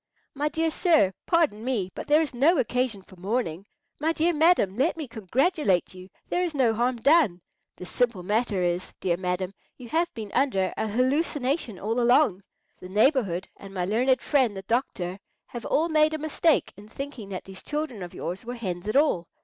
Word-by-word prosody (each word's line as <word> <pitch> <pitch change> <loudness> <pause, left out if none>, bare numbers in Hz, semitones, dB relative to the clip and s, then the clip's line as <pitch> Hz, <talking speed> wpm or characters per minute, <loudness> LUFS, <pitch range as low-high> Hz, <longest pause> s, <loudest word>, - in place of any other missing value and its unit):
"My 295 +2 -1
dear 320 +2 0
sir, 310 - +3
pardon 315 - +2
me; 225 -8 -1
but - - -7
there 300 +2 +5
is 300 - -5
no 295 +8 +4
occasion 245 -5 0
for 185 - -17
mourning. 195 -2 -2 0.3
My 320 +2 +1
dear 335 +2 +1
madam, 315 - +3
let 275 +8 +1
me 310 -4 -5
congratulate 230 - 0
you. 185 0 -12 0.2
There 355 - 0
is 345 -4 -2
no 250 -5 +3
harm 240 +3 +1
done. 260 - +3 0.4
The 180 - -9
simple 230 -2 0
matter 210 -1 0
is, 175 +1 -1
dear 180 -2 +1
madam, 180 +1 -2 0.2
you 245 -3 -11
have 335 +4 +1
been 215 -3 -6
under 195 -9 +1
a 220 - -2
hallucination 260 - 0
all 225 +6 -1
along. 240 -5 +4 0.4
The 180 - -10
neighbourhood 210 - +2
and 195 0 -11
my 180 -1 -1
learned 250 +6 +2
friend 255 -9 +2
the 190 - -6
doctor 190 -5 -2 0.3
have 240 -2 -7
all 320 +3 +2
made 310 -1 +3
a - - -2
mistake 315 +1 +1
in 205 +2 -13
thinking 265 -5 -7
that 185 -2 -5
these 190 -1 -11
children 300 -8 -4
of 175 -1 -8
yours 180 +5 -5
were 245 +1 -6
hens 185 -5 -5
at 215 - -2
all. 275 - +3
240 Hz, 190 wpm, -26 LUFS, 190-295 Hz, 0.4 s, there